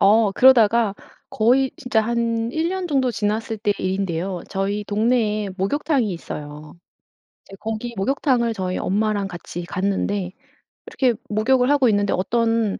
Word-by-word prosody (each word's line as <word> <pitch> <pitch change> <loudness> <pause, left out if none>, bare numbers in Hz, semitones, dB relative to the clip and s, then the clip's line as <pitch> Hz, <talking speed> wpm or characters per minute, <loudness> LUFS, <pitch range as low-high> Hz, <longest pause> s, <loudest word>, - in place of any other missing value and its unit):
어 210 +1 +5
그러다가 230 -3 +5 0.3
거의 255 +4 +2
진짜 250 -4 0
한 230 0 -1
1 320 +2 0
년 375 0 -3
정도 265 -4 +1
지났을 220 0 -2
때 205 -1 +1
일인데요. 185 -1 -2
저희 200 +2 -2
동네에 215 -1 0
목욕탕이 255 - 0
있어요. 150 -2 -8 0.7
이제 195 - -12
거기 225 +2 -4
목욕탕을 245 +1 +1
저희 185 -3 -3
엄마랑 205 0 0
같이 175 -1 -7
갔는데 195 0 -2 0.6
이렇게 255 -3 +1 0.2
목욕을 250 +5 +2
하고 280 -4 +4
있는데 205 -2 +1
어떤 225 +2 0
215 Hz, 300 characters per minute, -22 LUFS, 195-240 Hz, 0.7 s, 어